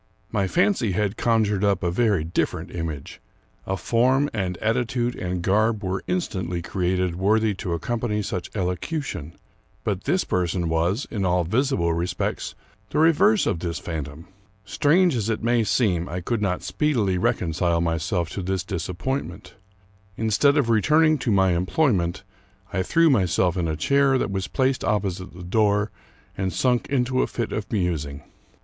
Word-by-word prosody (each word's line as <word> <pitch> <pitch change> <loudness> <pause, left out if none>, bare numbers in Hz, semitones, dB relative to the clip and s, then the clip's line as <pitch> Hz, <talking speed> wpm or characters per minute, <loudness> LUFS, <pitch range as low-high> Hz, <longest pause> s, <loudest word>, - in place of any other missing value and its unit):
My 100 -3 +1
fancy 175 - +1
had 105 +1 0
conjured 110 -4 +1
up 100 -2 +2
a 85 - +1
very 100 -4 +2
different 85 +2 -2
image. 80 -5 -5 0.5
A 95 - -1
form 130 +7 +2
and 95 -4 -2
attitude 120 +3 0
and 90 -1 -3
garb 110 +3 +2
were 95 0 -2
instantly 95 - -2
created 90 -1 -1
worthy 105 +3 +2
to 90 - -2
accompany 105 +4 -2
such 90 - -4
elocution; 90 - -3 0.5
but 100 -3 -2
this 180 +6 +2
person 90 -1 -1
was, 85 - 0
in 105 -4 -2
all 90 -1 +2
visible 95 - +1
respects, 85 +2 -2 0.3
the - - -3
reverse 185 +7 +4
of 85 - 0
this 85 -1 -3
phantom. 80 -1 -6 0.4
Strange 150 - +3
as 110 -2 -1
it 110 -1 -2
may 120 0 +3
seem, 95 -7 +1
I 90 - -3
could 110 +5 -2
not 95 -3 -1
speedily 100 -3 0
reconcile 85 -1 +1
myself 85 +1 -1
to 100 - -4
this 95 -1 -2
disap 90 -1 -4
pointment. 135 +6 -4 0.6
Instead 115 +7 +3
of 125 -5 +2
returning 155 +7 +4
to 125 - -1
my 95 -2 +4
employment, 90 - +1 0.5
I 95 - +1
threw 165 - +3
myself 90 -5 +2
in 90 -3 -1
a 80 - -1
chair 140 - +3
that 100 - -1
was 95 -1 -2
placed 130 0 0
opposite 95 -4 -1
the 90 - -9
door, 105 +2 +1 0.4
and 95 -1 -2
sunk 125 +2 +1
into 130 -1 +1
a - - +1
fit 115 -2 -3
of 110 - -4
musing. 80 -8 -2
100 Hz, 160 wpm, -24 LUFS, 90-120 Hz, 0.6 s, reverse